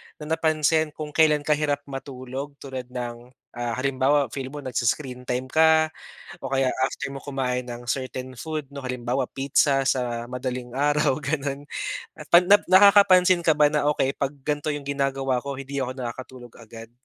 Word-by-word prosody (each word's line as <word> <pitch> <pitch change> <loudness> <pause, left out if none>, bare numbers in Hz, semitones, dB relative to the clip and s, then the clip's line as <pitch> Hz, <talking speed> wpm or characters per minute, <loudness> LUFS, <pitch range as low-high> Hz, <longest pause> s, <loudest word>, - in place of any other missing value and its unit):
na 150 - -11 0.2
napansin 155 0 +2
kung 150 -1 -6
kailan 150 -2 +3
ka 150 - -1
hirap 145 -1 +1
matulog, 135 0 -7
tulad 130 -2 -6
ng, 120 -1 -6 0.2
ah, 120 -1 -3
halimbawa 135 0 +1
feel 135 0 -4
mo 145 +1 -8
nag-i-screen 125 0 -2
time 125 +1 -2
ka, 160 0 +4 0.5
o 135 - -5
kaya 135 -1 +1 0.2
after 140 - -6
mo 135 - -8
kumain 130 -3 -2
ng 120 0 -8
certain 130 0 -4
food 155 +2 -5
'no, 140 - -6
halimbawa 125 0 -2
pizza 135 0 +2
sa 120 -3 -1
madaling 125 0 -5
araw 145 +1 +1
ganun, 140 0 -2 0.7
'pag 175 - +9 0.2
nakakapansin 185 -2 +6
ka 160 - +5
ba 150 -1 +4
na, 150 -1 0
"Okey 135 - +1
'pag 140 +1 -1
gan'to 150 +1 -1
yung 145 - -5
ginagawa 135 -2 0
ko 140 0 -4
hindi 135 +1 -5
ako 130 -1 -2
nakakatulog 125 0 -7
kaagad." 115 0 -12
135 Hz, 160 wpm, -24 LUFS, 125-150 Hz, 0.7 s, pag